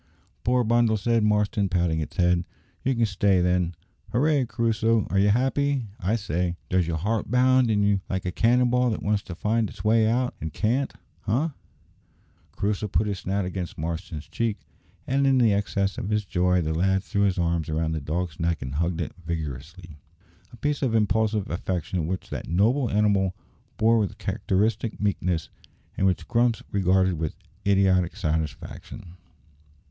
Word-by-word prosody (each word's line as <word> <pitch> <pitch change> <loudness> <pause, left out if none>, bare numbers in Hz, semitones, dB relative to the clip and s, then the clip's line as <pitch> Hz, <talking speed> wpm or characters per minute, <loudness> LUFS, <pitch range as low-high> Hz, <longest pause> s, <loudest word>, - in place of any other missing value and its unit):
"Poor 125 +1 +2
bundle!" 115 -1 +3
said 115 +2 +1
Marston, 105 -1 +1
patting 85 -3 +1
its 80 +4 -5
head, 90 -1 +3 0.4
"you 135 0 +1
can 115 -1 +2
stay 100 -2 +2
then. 90 -1 +1 0.4
Hooray! 140 +2 +2
Crusoe, 115 -1 +1
are 95 - +2
you 100 +1 +4
happy, 130 +1 +1
I 105 +2 0
say? 90 -4 -1
Does 90 -2 +2
your 85 -1 -1
heart 105 +7 -1
bound 130 0 +4
in 105 -2 +2
you 100 -1 +2
like 95 -1 -2
a 90 - -1
cannon 120 +5 +3
ball 125 0 +3
that 110 - -3
wants 105 0 +1
to 90 - -8
find 110 +3 0
its - - -10
way 110 0 +4
out, 125 +2 +1
and 80 - -4
can't, 120 - 0 0.4
eh?" 130 +11 +1 1.0
Crusoe 105 +1 -1
put 100 +1 +1
his 100 -3 -3
snout 95 +1 -1
against 90 -2 -5
Marston's 80 -1 -5
cheek, 115 -3 -1 0.5
and 135 +1 +1
in 135 -1 +4
the 115 -4 +4
excess 100 -1 -1
of 95 - -4
his 105 -1 0
joy 90 -1 +2
the 80 0 -1
lad 95 +4 +1
threw 100 - -1
his 100 -1 +2
arms 85 -2 0
round 80 0 -1
the 80 - -3
dog's 80 +2 -3
neck 85 -2 -1
and 65 +1 -5
hugged 85 +3 -1
it 85 - -4
vigorously 80 +1 -6 0.5
a 120 - -13
piece 145 +3 -1
of 125 -5 +1
impulsive 110 -1 +1
affection 85 -1 -2
which 95 +1 -4
that - - -5
noble 115 +9 +2
animal 100 -3 +2 0.4
bore 115 +1 +4
with 105 -3 -2
characteristic 105 +3 -1
meekness, 90 -5 -1 0.5
and 95 - +2
which 90 - -1
Grumps 120 -1 +1
regarded 95 -3 +2
with 80 -2 -3 0.3
idiotic 95 -3 +3
satisfaction. 80 +2 -4
100 Hz, 170 wpm, -25 LUFS, 90-115 Hz, 1.0 s, you